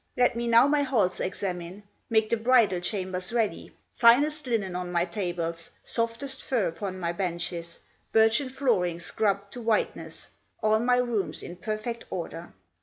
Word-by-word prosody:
Let 245 Hz, -1 st, +3 dB
me 235 Hz, 0 st, -2 dB
now 235 Hz, +2 st, +6 dB
my 290 Hz, 0 st, +3 dB
halls 230 Hz, -10 st, +1 dB
examine; 185 Hz, 0 st, -4 dB, 0.3 s
Make 220 Hz, -1 st, +2 dB
the -, -, +4 dB
bridal 230 Hz, -5 st, +3 dB
chambers 185 Hz, 0 st, -2 dB
ready, 230 Hz, -3 st, -1 dB, 0.2 s
Finest 285 Hz, +5 st, +4 dB
linen 205 Hz, -7 st, -1 dB
on 180 Hz, 0 st, -4 dB
my 175 Hz, 0 st, +2 dB
tables, 170 Hz, -4 st, -4 dB
Softest 235 Hz, +4 st, 0 dB
furs 235 Hz, -9 st, 0 dB
upon 185 Hz, +3 st, -5 dB
my 170 Hz, -2 st, -1 dB
benches, 170 Hz, -2 st, -3 dB, 0.3 s
Birchen 225 Hz, +4 st, +4 dB
flooring 215 Hz, -11 st, 0 dB
scrubbed 200 Hz, +2 st, -1 dB
to 245 Hz, -, -7 dB
whiteness, 225 Hz, -2 st, -1 dB, 0.3 s
All 215 Hz, 0 st, +4 dB
my 245 Hz, +2 st, +3 dB
rooms 235 Hz, -6 st, -1 dB
in 175 Hz, -, -7 dB
perfect 215 Hz, +5 st, -4 dB
order." 170 Hz, -1 st, -6 dB
215 Hz, 150 wpm, -27 LUFS, 180-235 Hz, 0.3 s, now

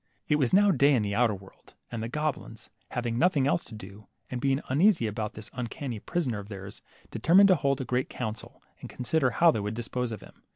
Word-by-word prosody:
It 150 Hz, -, +3 dB
was 135 Hz, -5 st, +1 dB
now 205 Hz, +1 st, +5 dB
day 140 Hz, -2 st, +4 dB
in 115 Hz, -, +1 dB
the 100 Hz, 0 st, -2 dB
outer 115 Hz, -1 st, +2 dB
world, 95 Hz, 0 st, -17 dB, 0.2 s
and 115 Hz, -, -4 dB
the 115 Hz, -, -4 dB
goblins, 150 Hz, -5 st, -4 dB, 0.2 s
hav 125 Hz, -1 st, -3 dB
ing 115 Hz, 0 st, -1 dB
nothing 155 Hz, -5 st, +3 dB
else 145 Hz, +5 st, +1 dB
to 110 Hz, -, -11 dB
do, 105 Hz, 0 st, -12 dB, 0.2 s
and 125 Hz, -1 st, -3 dB
being 135 Hz, 0 st, +1 dB
uneasy 165 Hz, -, +3 dB
about 105 Hz, 0 st, -3 dB
this 110 Hz, -1 st, -8 dB
uncanny 125 Hz, -1 st, -5 dB
prisoner 130 Hz, -, -2 dB
of 100 Hz, 0 st, -10 dB
theirs, 95 Hz, -1 st, -9 dB, 0.3 s
determined 195 Hz, +4 st, +5 dB
to 185 Hz, -, +6 dB
hold 140 Hz, -3 st, 0 dB
a -, -, -4 dB
great 125 Hz, +1 st, -1 dB
council, 110 Hz, -2 st, -6 dB, 0.2 s
and -, -, -9 dB
consider 130 Hz, +1 st, 0 dB
how 165 Hz, +9 st, +4 dB
they 110 Hz, -, -2 dB
would 105 Hz, +2 st, -3 dB
dispose 120 Hz, +1 st, -3 dB
of 110 Hz, -, -6 dB
him. -, -, -16 dB
125 Hz, 225 wpm, -28 LUFS, 110-145 Hz, 0.3 s, to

